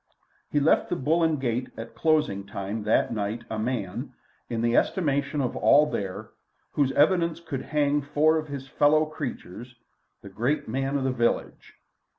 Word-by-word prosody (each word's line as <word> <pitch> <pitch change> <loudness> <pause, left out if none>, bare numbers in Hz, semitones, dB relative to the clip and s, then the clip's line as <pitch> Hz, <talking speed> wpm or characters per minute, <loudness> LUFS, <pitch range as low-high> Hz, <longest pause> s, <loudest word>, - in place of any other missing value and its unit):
He 145 - +1
left 145 +3 +3
the - - 0
"Bull 165 +2 +1
and 160 -3 +2
Gate" 125 -1 -2
at 115 - -8
closing 150 -12 +1
time 100 +2 -4
that 110 - +2
night 105 +2 -3
a 110 - -2
man, 110 -5 -3 0.4
in 115 -1 -2
the 120 0 +2
estimation 140 -4 +1
of 125 - -2
all 150 +2 +5
there, 95 -2 -4 0.4
whose 140 -3 +1
evidence 170 +2 +3
could 160 -6 -5
hang 145 -1 +1
four 150 +3 +2
of 155 0 -3
his 140 -2 -7
fellow 150 +2 +3
creatures, 125 - -7 0.5
the 100 - -9
great 120 +10 -1
man 135 +4 -1
of 135 - -2
the 130 - +1
village. 120 -2 -2
135 Hz, 165 wpm, -26 LUFS, 115-150 Hz, 0.5 s, all